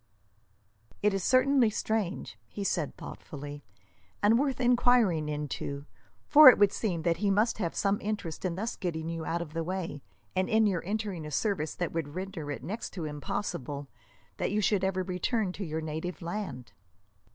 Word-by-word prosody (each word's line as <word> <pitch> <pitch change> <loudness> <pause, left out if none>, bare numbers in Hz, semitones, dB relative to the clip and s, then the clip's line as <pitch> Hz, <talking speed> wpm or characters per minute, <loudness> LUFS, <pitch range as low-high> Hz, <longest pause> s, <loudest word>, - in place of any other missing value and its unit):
"It 210 -1 +4
is 195 -2 -1
certainly 255 0 +4
strange," 195 - -2
he 200 - -5
said 165 -6 -1
thoughtfully, 145 0 -8 0.6
"and 220 +3 +5
worth 275 -2 0
enquiring 240 -10 +3
into, 145 -1 -4 0.4
for 300 -2 +11
it - - +6
would 205 -1 +5
seem 175 -7 -1
that 170 -1 +2
he 200 +3 +1
must 215 +3 +2
have 170 -5 -2
some 200 0 +1
interest 205 -7 -4
in 180 -3 -1
thus 220 +6 -3
getting 165 -3 -3
you 165 -1 -4
out 170 +1 -1
of 155 -2 -12
the 165 0 -1
way, 170 -4 -4 0.3
and 185 0 +1
in 220 0 +4
your 185 -5 +1
entering 205 -4 -2
a 150 - -6
service 160 0 -1
that 175 - -2
would 160 -2 -4
render 185 -5 -5
it 145 - -5
next 205 +10 -5
to 170 -4 -4
impossible 145 -2 -4 0.5
that - - 0
you 210 - +1
should 205 -2 +2
ever 190 -1 +1
return 185 +3 -1
to 195 - -6
your 160 -2 -3
native 160 +3 -4
land." 165 - -5
185 Hz, 175 wpm, -30 LUFS, 160-210 Hz, 0.6 s, for